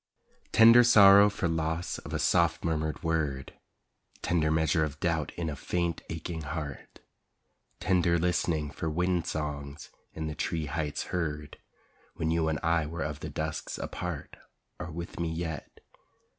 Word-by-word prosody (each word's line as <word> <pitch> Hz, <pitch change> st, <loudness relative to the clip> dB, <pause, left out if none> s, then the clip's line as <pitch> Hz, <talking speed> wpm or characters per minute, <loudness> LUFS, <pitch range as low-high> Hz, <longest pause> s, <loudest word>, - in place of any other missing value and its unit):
Tender 115 Hz, +2 st, +8 dB
sorrow 100 Hz, -3 st, +8 dB
for 100 Hz, -3 st, -2 dB
loss 80 Hz, +1 st, -2 dB
of -, -, -10 dB
a -, -, -1 dB
soft -, -, +2 dB
murmured 80 Hz, -1 st, -2 dB
word, 75 Hz, -5 st, -1 dB, 0.7 s
Tender 80 Hz, -2 st, +1 dB
measure 80 Hz, 0 st, +2 dB
of 75 Hz, 0 st, -4 dB
doubt 85 Hz, -3 st, 0 dB
in 85 Hz, -1 st, -2 dB
a 75 Hz, -, -3 dB
faint, 85 Hz, +3 st, -2 dB
aching 80 Hz, 0 st, -5 dB
heart, 75 Hz, -2 st, -6 dB, 0.8 s
Tender 85 Hz, -2 st, +2 dB
listening 80 Hz, -3 st, 0 dB
for 80 Hz, -, -3 dB
wind 90 Hz, +1 st, 0 dB
songs 75 Hz, -2 st, -5 dB, 0.2 s
in 80 Hz, -, -4 dB
the 75 Hz, -, -3 dB
tree 80 Hz, +1 st, -2 dB
heights 75 Hz, -1 st, -3 dB
heard 75 Hz, -4 st, -3 dB, 0.6 s
When 80 Hz, -1 st, -1 dB
you 80 Hz, -1 st, +1 dB
and 80 Hz, -1 st, 0 dB
I 85 Hz, -2 st, +2 dB
were 85 Hz, +1 st, -4 dB
of 75 Hz, 0 st, -4 dB
the 80 Hz, -, -6 dB
dusks 80 Hz, +1 st, -4 dB
a -, -, -4 dB
part, 90 Hz, -5 st, -6 dB, 0.4 s
Are 85 Hz, -, -5 dB
with 85 Hz, +2 st, -7 dB
me 85 Hz, -1 st, -1 dB
yet. 80 Hz, -1 st, -4 dB
80 Hz, 155 wpm, -29 LUFS, 75-85 Hz, 0.8 s, Tender